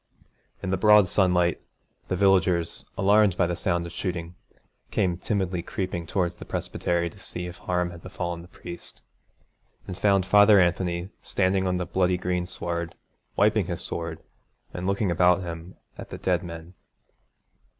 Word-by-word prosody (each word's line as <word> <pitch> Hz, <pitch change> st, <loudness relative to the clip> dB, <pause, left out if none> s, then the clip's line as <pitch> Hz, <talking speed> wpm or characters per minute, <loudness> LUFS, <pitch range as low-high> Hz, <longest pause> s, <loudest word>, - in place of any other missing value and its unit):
In 95 Hz, -, -2 dB
the 95 Hz, -, +1 dB
broad 105 Hz, -2 st, +7 dB
sunlight, 90 Hz, -3 st, +2 dB, 0.5 s
the -, -, -1 dB
villagers, 90 Hz, -3 st, +2 dB
alarmed 100 Hz, -1 st, +4 dB
by 90 Hz, -, +3 dB
the 90 Hz, 0 st, -1 dB
sound 85 Hz, -1 st, -1 dB
of 85 Hz, -, -7 dB
shooting, 85 Hz, -1 st, -4 dB, 0.6 s
came 90 Hz, -2 st, +1 dB
timidly 95 Hz, -1 st, -1 dB
creeping 90 Hz, -2 st, -4 dB
towards 90 Hz, -1 st, -1 dB
the -, -, -9 dB
presbytery 85 Hz, 0 st, -1 dB
to -, -, -17 dB
see 90 Hz, -, -4 dB
if 90 Hz, 0 st, -8 dB
harm 90 Hz, -1 st, -1 dB
had 85 Hz, -1 st, -11 dB
befallen 90 Hz, -2 st, -4 dB
the 85 Hz, -, -13 dB
priest, 85 Hz, -1 st, -10 dB, 0.8 s
and 90 Hz, -, -6 dB
found 100 Hz, -1 st, +2 dB
Father 105 Hz, +1 st, +7 dB
Anthony 90 Hz, 0 st, +1 dB
standing 95 Hz, 0 st, +1 dB
on 90 Hz, 0 st, +1 dB
the 90 Hz, -, -2 dB
bloody 90 Hz, 0 st, +1 dB
green 90 Hz, -1 st, -2 dB
sward 85 Hz, -1 st, -4 dB, 0.4 s
wiping 105 Hz, -2 st, +3 dB
his 85 Hz, -2 st, -4 dB
sword 80 Hz, -1 st, -5 dB, 0.5 s
and 90 Hz, +1 st, -4 dB
looking 100 Hz, -1 st, +1 dB
about 90 Hz, +2 st, +4 dB
him 85 Hz, +1 st, -7 dB, 0.2 s
at -, -, -8 dB
the -, -, -6 dB
dead -, -, +1 dB
men. 85 Hz, 0 st, -9 dB
90 Hz, 160 wpm, -26 LUFS, 85-95 Hz, 0.8 s, broad